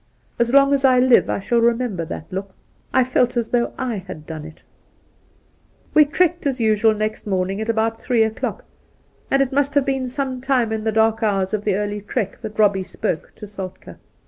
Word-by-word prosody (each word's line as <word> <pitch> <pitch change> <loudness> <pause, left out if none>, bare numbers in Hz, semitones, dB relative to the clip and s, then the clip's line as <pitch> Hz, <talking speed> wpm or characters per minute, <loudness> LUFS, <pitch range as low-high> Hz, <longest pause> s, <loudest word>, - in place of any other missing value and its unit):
As 235 0 +2
long 275 +1 +5
as 275 -1 +1
I 255 -2 +5
live 250 -1 +4
I - - 0
shall 235 +4 0
remember 230 -6 +1
that 155 - -7
look. 195 0 -5 0.4
I 260 - +4
felt 250 -1 +1
as 235 -2 -1
though 240 -1 +1
/ - - -27
had 195 -11 -5
done 155 -1 -7
it! 160 0 -13 1.3
We 305 - +7
trekked 345 +2 +1
as 265 -2 -1
usual 220 -1 +3
next 215 0 -3
morning 190 +1 -1
at 220 - -4
about 225 0 0
three 240 -3 +2
o'clock, 220 0 -3 0.6
and 275 0 +3
it 265 - -5
must 285 +1 +1
have 285 -2 +3
been 270 -2 -1
some 260 -1 -3
time 255 -4 +1
in 220 -1 -2
the 220 - +1
dark 220 +1 +2
hours 195 -3 0
of 210 -1 -1
the 205 -3 +2
early 205 +1 -2
trek 205 -1 -3
that 215 -2 -7
Eobbie 205 -3 +3
spoke 160 -3 -4
to - - -9
Soltk^. 195 -3 -8
225 Hz, 200 wpm, -21 LUFS, 205-255 Hz, 1.3 s, We